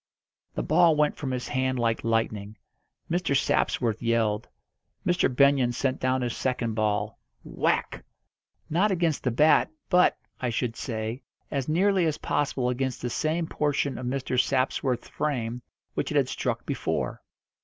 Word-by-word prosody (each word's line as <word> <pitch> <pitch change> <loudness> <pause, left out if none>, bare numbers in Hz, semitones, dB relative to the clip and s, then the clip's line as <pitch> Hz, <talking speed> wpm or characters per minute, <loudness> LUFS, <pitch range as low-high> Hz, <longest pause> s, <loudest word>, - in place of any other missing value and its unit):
The - - -1
ball 165 0 +4
went 150 0 +2
from 140 - -4
his 125 -1 -3
hand 130 0 0
like 115 -2 0
lightning. 110 -2 -1 0.5
Mr. 165 -5 +1
Sapsworth 115 -5 0
yelled. 115 -2 +1 0.6
Mr. 175 0 +2
Benyon 135 -1 +4
sent 130 +1 -1
down 130 0 +1
his 120 -2 -2
second 120 -3 -1
ball 105 -1 -1 0.2
whack! - - -1 0.6
not 180 +7 +2
against 170 -5 0
the 125 - +2
bat, 150 +6 +4 0.2
but, 180 0 +5 0.2
I 125 - -1
should 115 0 -2
say, 115 +1 -4 0.3
as 140 -1 -2
nearly 185 +2 +3
as 155 -1 -1
possible 135 -3 0
against 125 0 -2
the 120 - -2
same 160 +5 0
portion 145 -3 -1
of 125 - -4
Mr. 130 -1 +1
Sapsworth's 130 -1 0
frame 125 -5 -2 0.3
which - - -2
it - - 0
had - - +2
struck - - -2
before. - - -2
130 Hz, 150 wpm, -27 LUFS, 115-150 Hz, 0.6 s, but